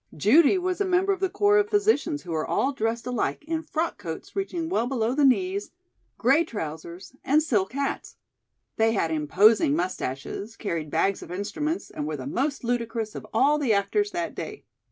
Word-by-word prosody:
Judy 280 Hz, -, +5 dB
was 365 Hz, +1 st, -2 dB
a -, -, +2 dB
member 375 Hz, +2 st, +2 dB
of 380 Hz, -, -5 dB
the 380 Hz, 0 st, 0 dB
corps 410 Hz, +1 st, +3 dB
of 415 Hz, 0 st, +1 dB
physicians 405 Hz, -8 st, +1 dB
who 175 Hz, -, -7 dB
were 160 Hz, -1 st, -1 dB
all 275 Hz, +2 st, +1 dB
dressed 230 Hz, -1 st, -2 dB
alike 250 Hz, +4 st, -2 dB
in 325 Hz, 0 st, -1 dB
frock 325 Hz, -5 st, -3 dB
coats 165 Hz, -5 st, -7 dB
reaching 355 Hz, -4 st, -2 dB
well 285 Hz, -9 st, 0 dB
below 240 Hz, -2 st, 0 dB
the 290 Hz, +2 st, +2 dB
knees, 370 Hz, +9 st, +2 dB, 0.5 s
gray 270 Hz, +8 st, +4 dB
trousers 170 Hz, -, -7 dB
and 300 Hz, +3 st, +3 dB
silk 210 Hz, -8 st, 0 dB
hats. 280 Hz, 0 st, -3 dB, 0.6 s
They 225 Hz, 0 st, +3 dB
had 165 Hz, -6 st, 0 dB
imposing 160 Hz, +3 st, +4 dB
mustaches, 180 Hz, -, -4 dB
carried 165 Hz, -7 st, -3 dB
bags 195 Hz, +6 st, +1 dB
of -, -, -10 dB
instruments 255 Hz, -, -3 dB
and 150 Hz, -, -4 dB
were 155 Hz, -1 st, -3 dB
the 130 Hz, -, -7 dB
most 270 Hz, -, -2 dB
ludicrous 230 Hz, -2 st, -2 dB
of -, -, -8 dB
all 285 Hz, +6 st, +3 dB
the 260 Hz, -7 st, +2 dB
actors 410 Hz, -, +1 dB
that 345 Hz, -3 st, -3 dB
day. -, -, -7 dB
250 Hz, 185 wpm, -26 LUFS, 200-330 Hz, 0.6 s, Judy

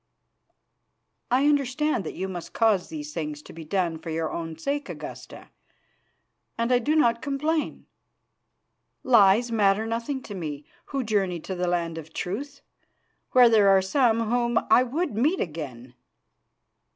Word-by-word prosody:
"I 260 Hz, +3 st, +3 dB
understand 285 Hz, -, +1 dB
that -, -, -6 dB
you 190 Hz, -, -3 dB
must 175 Hz, -3 st, -7 dB
cause 220 Hz, -5 st, +2 dB
these 150 Hz, -1 st, -7 dB
things 150 Hz, -2 st, -5 dB
to -, -, -12 dB
be 165 Hz, -, -9 dB
done 170 Hz, 0 st, -1 dB
for 165 Hz, +1 st, -8 dB
your 160 Hz, 0 st, -2 dB
own 165 Hz, -1 st, -5 dB
sake, 285 Hz, -, -3 dB
Augusta, -, -, -9 dB, 1.1 s
and 230 Hz, +2 st, 0 dB
I 250 Hz, -, +5 dB
do 295 Hz, +6 st, 0 dB
not 235 Hz, -6 st, +3 dB
complain. 300 Hz, +2 st, -2 dB, 1.2 s
Lies 230 Hz, -1 st, +5 dB
matter 210 Hz, -1 st, +2 dB
nothing 235 Hz, +4 st, -3 dB
to 205 Hz, -, -8 dB
me, 150 Hz, -6 st, -6 dB, 0.2 s
who 275 Hz, -2 st, -3 dB
journey 195 Hz, -6 st, 0 dB
to 190 Hz, -, -5 dB
the 180 Hz, 0 st, -2 dB
Land 170 Hz, -2 st, -1 dB
of 160 Hz, 0 st, -12 dB
Truth, 275 Hz, +10 st, -5 dB, 0.7 s
where 250 Hz, -1 st, +8 dB
there 215 Hz, -3 st, +5 dB
are 195 Hz, 0 st, +6 dB
some 230 Hz, +3 st, +2 dB
whom 235 Hz, +1 st, +1 dB
I -, -, +7 dB
would 280 Hz, +5 st, -2 dB
meet 290 Hz, -, +1 dB
again. 135 Hz, -7 st, -6 dB
215 Hz, 150 wpm, -25 LUFS, 170-255 Hz, 1.2 s, where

